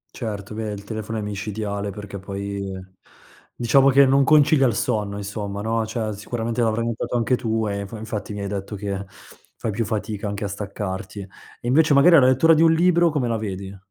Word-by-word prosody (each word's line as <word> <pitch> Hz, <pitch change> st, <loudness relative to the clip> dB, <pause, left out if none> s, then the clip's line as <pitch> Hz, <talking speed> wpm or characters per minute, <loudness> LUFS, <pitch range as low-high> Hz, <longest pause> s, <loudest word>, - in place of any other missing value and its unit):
Certo. 105 Hz, -3 st, -5 dB
Beh, 110 Hz, 0 st, -4 dB
il 100 Hz, 0 st, -8 dB
telefono 110 Hz, +1 st, -5 dB
è -, -, -2 dB
micidiale, 100 Hz, 0 st, -4 dB
perché 100 Hz, 0 st, -7 dB
poi, 100 Hz, 0 st, -5 dB, 0.8 s
diciamo 135 Hz, +4 st, +4 dB
che 140 Hz, +1 st, +6 dB
non 135 Hz, +1 st, +4 dB
concilia 150 Hz, -1 st, +5 dB
il 115 Hz, -, 0 dB
sonno 105 Hz, -2 st, -1 dB
insomma, 100 Hz, 0 st, -5 dB
no, 110 Hz, 0 st, 0 dB
cioè, 110 Hz, -1 st, -3 dB
sicuramente 115 Hz, +3 st, -3 dB
l'avrai 115 Hz, 0 st, +1 dB
notato 115 Hz, +1 st, -3 dB
anche 120 Hz, +2 st, +2 dB
tu 115 Hz, -2 st, -1 dB
e 100 Hz, -1 st, -2 dB
infa 100 Hz, +3 st, -6 dB
infatti 105 Hz, -1 st, -5 dB
mi 100 Hz, -, -5 dB
hai 100 Hz, -, -3 dB
detto 100 Hz, +1 st, -5 dB
che 100 Hz, -1 st, -4 dB, 0.5 s
fai 110 Hz, -, -3 dB
più 115 Hz, +3 st, -1 dB
fatica 105 Hz, 0 st, -3 dB
anche 100 Hz, +1 st, -4 dB
a -, -, -1 dB
staccarti. 100 Hz, 0 st, -5 dB, 0.4 s
E -, -, -6 dB
invece 145 Hz, +3 st, +4 dB
magari 165 Hz, +4 st, +7 dB
la 130 Hz, -, +5 dB
lettura 130 Hz, +6 st, +5 dB
di 160 Hz, -, +3 dB
un 165 Hz, 0 st, +6 dB
libro 170 Hz, 0 st, +4 dB
come 145 Hz, -6 st, -1 dB
la 115 Hz, -1 st, 0 dB
vedi? 100 Hz, -2 st, -5 dB
110 Hz, 200 wpm, -23 LUFS, 100-125 Hz, 0.8 s, magari